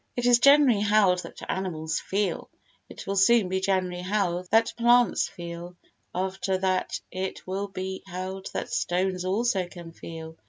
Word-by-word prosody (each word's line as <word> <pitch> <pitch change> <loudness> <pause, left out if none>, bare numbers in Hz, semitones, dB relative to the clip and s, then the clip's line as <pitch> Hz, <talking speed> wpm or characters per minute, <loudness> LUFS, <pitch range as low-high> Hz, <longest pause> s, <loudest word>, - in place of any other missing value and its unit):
It 245 - -2
is 245 -1 +6
generally 275 -5 +6
held 205 -3 +4
that - - -9
animals 165 -4 -2
feel; 200 0 -2 0.4
it - - -10
will 195 - -2
soon 200 0 +4
be 190 0 0
generally 185 -2 0
held 185 -2 -1
that 225 +1 +3
plants 240 +1 +4
feel; 170 +1 -8 0.4
after 190 +1 -1
that 185 -1 -1
it 185 +1 -5
will 195 +2 -3
be 190 -1 -5
held 190 +1 -5
that 240 - -4
stones 185 -2 0
also 195 -1 0
can 175 -2 -11
feel. 160 -1 -9
190 Hz, 155 wpm, -26 LUFS, 180-205 Hz, 0.4 s, is